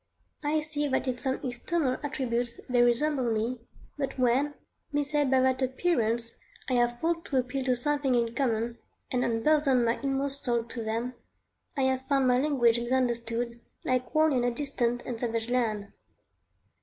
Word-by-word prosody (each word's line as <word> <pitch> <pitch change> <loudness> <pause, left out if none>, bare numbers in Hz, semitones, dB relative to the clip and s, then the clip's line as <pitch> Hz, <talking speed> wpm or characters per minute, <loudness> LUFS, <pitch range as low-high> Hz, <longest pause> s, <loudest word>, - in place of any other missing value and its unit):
I 305 +1 +1
see 300 -1 -1
that 265 0 0
in 250 -1 -1
some 265 -1 -1
external 255 +2 0
attributes 245 -5 -1
they 245 -1 +3
resemble 245 +1 +2
me, 225 +3 -1 0.4
but 275 -1 -2
when, 260 +4 +2 0.4
misled 290 -1 +1
by 260 0 +4
that 260 0 +2
appearance, 235 -5 0 0.3
I 260 - -1
have 240 -1 +2
thought 330 +2 0
to 270 - -1
appeal 255 +1 -1
to 255 -1 +3
something 280 0 +1
in 235 -1 +1
common, 235 -2 -1 0.3
and 250 -1 +1
unburthen 260 +2 +3
my 230 +1 +1
inmost 275 0 -2
soul 240 -2 +1
to 230 0 -5
them, 230 +3 -2 0.6
I 270 - +2
have 260 0 0
found 275 -2 +3
my 250 0 +4
language 250 -5 +3
misunderstood, 235 -1 -1 0.3
like 255 0 -1
one 310 -1 +4
in 250 -2 +2
a 245 - +3
distant 245 -2 -1
and 240 -3 -4
savage 230 -1 -2
land. 215 -5 0
255 Hz, 165 wpm, -28 LUFS, 235-275 Hz, 0.6 s, by